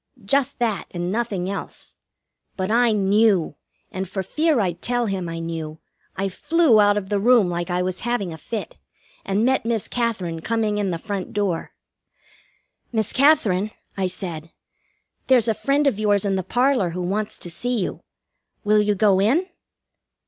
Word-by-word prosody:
Just 275 +4 +1
that, 225 -6 -1
and 175 0 -3
nothing 210 -5 -2
else. 195 0 -6 0.6
But 190 +2 -1
I 240 0 +4
knew, 205 -3 +3 0.4
and 190 -1 -4
for 190 0 -3
fear 305 - +1
I'd 180 -5 -1
tell 245 0 0
him 190 -4 -3
I 165 - -5
knew, 165 -2 -5 0.4
I 195 +1 0
flew 290 - +3
out 205 0 +4
of 190 -2 -4
the 205 -1 +1
room 230 -3 +4
like 175 +1 -3
I 180 0 0
was 185 0 -3
having 240 -7 -2
a - - -8
fit, 225 +4 -6 0.5
and 200 +4 0
met 265 +1 +2
Miss 230 -2 -1
Katherine 200 -9 -2
coming 215 +2 -1
in 200 -2 0
the 170 - -2
front 200 +1 -5
door. 195 -5 -2 1.2
"Miss 220 -3 -1
Katherine," 215 -9 +3 0.3
I 190 -1 0
said, 170 -3 -5 0.8
"there's 250 -3 +4
a 225 - +3
friend 280 +6 +1
of 265 -7 +1
yours 205 -2 +2
in 195 -1 +1
the 190 - 0
parlor 245 -1 +1
who 180 +2 -4
wants 205 +4 -2
to 175 - -8
see 245 +8 -2
you. 190 - -3 0.6
Will 210 0 +4
you 210 0 +1
go 200 -1 +3
in?" 275 - +3
205 Hz, 170 wpm, -22 LUFS, 185-235 Hz, 1.2 s, I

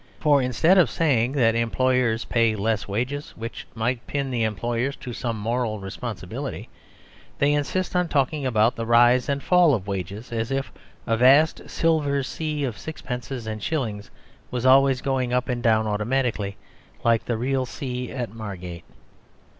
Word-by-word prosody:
For 145 -2 +4
instead 155 - +3
of 160 -9 +4
saying 130 -6 +1
that 120 -5 +3
employers 115 0 +1
pay 115 -2 +2
less 110 +1 -1
wages, 125 +8 -3
which 115 +1 -7
might 120 +2 -2
pin 140 -2 -2
the 120 -2 -1
employers 115 +5 -1
to 125 - -8
some 115 -1 -3
moral 115 0 -1
responsibility, 95 0 -6 0.7
they 145 +1 +3
insist 175 +6 -1
on 180 -1 +2
talking 145 0 0
about 115 -2 +2
the 115 -1 -4
"rise 120 +2 +5
and 140 0 -1
fall" 175 -5 +5
of 95 -5 -5
wages; 100 +3 -5
as 115 -1 -2
if 135 0 -2 0.3
a 115 - +1
vast 135 +6 +4
silver 150 -4 +1
sea 150 +1 -3
of 120 -6 -3
sixpences 125 -5 -6
and 110 -1 -5
shillings 110 -8 -3 0.4
was 125 0 -3
always 135 0 +5
going 130 -2 -1
up 125 0 +1
and 125 -1 -2
down 110 -1 +3
automatically 105 -1 -1 0.5
like 115 -1 +3
the 120 - -1
real 130 +2 -1
sea 125 -1 -5
at 120 -5 -4
Margate. 90 -6 -7
125 Hz, 160 wpm, -24 LUFS, 110-135 Hz, 0.7 s, rise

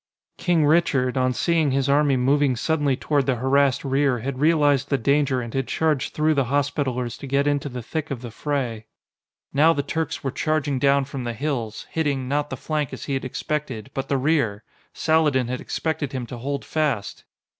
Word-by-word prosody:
King 170 -4 +2
Richard, 145 -5 +2
on 130 -1 +2
seeing 160 +3 +1
his 135 0 +1
army 140 -1 +3
moving 135 +1 +2
suddenly 145 0 0
toward 140 -2 0
the 130 - +2
harassed 135 +2 +2
rear, 135 -1 +2
had 130 +3 -4
realized 145 -3 +3
the 140 - +2
danger 140 +1 +2
and 115 -1 -7
had 135 -2 -1
charged 155 -1 0
through 155 +1 +3
the 140 -3 +1
Hospitallers 130 -3 -1
to 140 - -7
get 140 +1 +1
into 145 -1 0
the 125 -2 -6
thick 160 +5 -4
of 130 -4 -5
the 120 - -6
fray. 120 -5 -3 0.7
Now 155 +4 +5
the 140 - -1
Turks 160 +2 -3
were 135 - -1
charging 150 -3 0
down 140 0 +3
from 135 -1 -6
the 120 -1 -3
hills, 120 -4 -3
hitting 140 -5 -1
not 145 +2 0
the - - -5
flank 150 -3 -2
as - - -7
he 140 - -3
had 135 - -1
expected, 130 -2 -4
but 135 0 -4
the 140 - +2
rear! 130 -7 +1 0.3
Saladin 150 -6 +2
had 125 0 -3
expected 155 -4 -3
him 130 -2 -3
to 120 +1 -8
hold 140 +3 -3
fast! 150 -10 -2
140 Hz, 195 wpm, -23 LUFS, 130-150 Hz, 0.7 s, Now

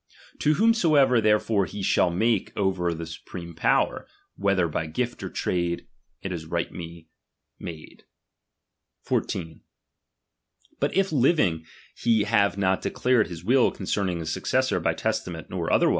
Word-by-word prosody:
To 150 +1 +3
whomsoever 155 - +4
therefore 105 -2 +2
I - - -12
he 100 -1 -6
shall 90 - +3
make 110 +4 +1
over 95 -3 +1
the 85 0 -5
supreme 85 +1 -9
power, 80 - +1 0.3
whether 100 -2 +2
i 80 - -4
by 80 - -1
gift 120 +10 -3
or - - -5
sale, 85 -1 0 0.5
it 95 - -3
is 80 -3 -5
rightly 85 0 -5 0.5
made. 80 -3 -9 1.0
14. 80 -3 -2 1.2
But - - 0
if 195 -2 +2
living 120 - +2 0.3
he 115 -3 +2
have 100 -2 +2
not 95 -1 +1
declared 125 -3 +1
his 85 -2 -8
will 130 +1 +4
Am™"'^'' - - -12
concerning 95 -2 -1
his 80 -1 -3
successor - - +1
by - - 0
testament - - -3
nor - - -2
other - - +4
uJiUununi. - - +4
95 Hz, 150 wpm, -25 LUFS, 85-115 Hz, 1.2 s, whomsoever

